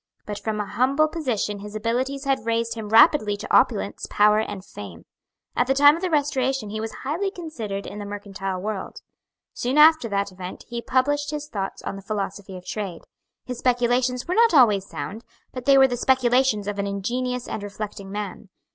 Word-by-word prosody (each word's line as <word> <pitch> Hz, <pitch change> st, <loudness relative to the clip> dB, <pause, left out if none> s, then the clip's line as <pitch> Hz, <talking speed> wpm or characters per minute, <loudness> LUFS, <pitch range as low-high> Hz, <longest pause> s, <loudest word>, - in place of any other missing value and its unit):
But 205 Hz, -1 st, -5 dB
from 215 Hz, -1 st, -3 dB
a 210 Hz, -, -1 dB
humble 260 Hz, +9 st, +2 dB
position 245 Hz, -10 st, -2 dB
his 210 Hz, +1 st, -9 dB
abilities 255 Hz, +5 st, -1 dB
had 270 Hz, -3 st, +1 dB
raised 230 Hz, 0 st, 0 dB
him 220 Hz, -2 st, -6 dB
rapidly 220 Hz, -2 st, +5 dB
to -, -, -1 dB
opulence, -, -, +2 dB
power 210 Hz, +1 st, +4 dB
and 205 Hz, -3 st, -4 dB
fame. 95 Hz, -5 st, -10 dB, 0.5 s
At 245 Hz, -, +2 dB
the 270 Hz, -, +2 dB
time 290 Hz, +2 st, +7 dB
of 335 Hz, -, -6 dB
the 370 Hz, -, -1 dB
Restoration 270 Hz, -7 st, 0 dB
he 215 Hz, 0 st, -3 dB
was 225 Hz, 0 st, -4 dB
highly 330 Hz, +9 st, -1 dB
considered 240 Hz, -, -6 dB
in 205 Hz, -, -7 dB
the 205 Hz, -, -5 dB
mercantile 195 Hz, -2 st, -5 dB
world. 205 Hz, 0 st, -5 dB, 0.5 s
Soon 255 Hz, +4 st, -1 dB
after 310 Hz, -5 st, +6 dB
that 200 Hz, -1 st, -1 dB
event 185 Hz, 0 st, -8 dB
he 235 Hz, -1 st, -4 dB
published 290 Hz, +4 st, +1 dB
his 300 Hz, -1 st, -4 dB
thoughts 195 Hz, -8 st, -5 dB
on 195 Hz, -, -4 dB
the -, -, -9 dB
philosophy 195 Hz, -1 st, -4 dB
of 180 Hz, -, -12 dB
trade. 195 Hz, -6 st, -5 dB, 0.4 s
His 250 Hz, -1 st, -6 dB
speculations 245 Hz, 0 st, +1 dB
were 355 Hz, -, 0 dB
not 455 Hz, -3 st, +4 dB
always 210 Hz, -8 st, +5 dB
sound; 175 Hz, +11 st, -6 dB, 0.3 s
but 255 Hz, -1 st, -7 dB
they 275 Hz, -1 st, +6 dB
were 265 Hz, 0 st, +7 dB
the 245 Hz, -, -2 dB
speculations 250 Hz, -4 st, +2 dB
of 205 Hz, -1 st, -3 dB
an 200 Hz, -, -1 dB
ingenious 245 Hz, +5 st, -2 dB
and -, -, -4 dB
reflecting 200 Hz, -1 st, -7 dB
man. 205 Hz, 0 st, -6 dB
230 Hz, 190 wpm, -24 LUFS, 205-265 Hz, 0.5 s, time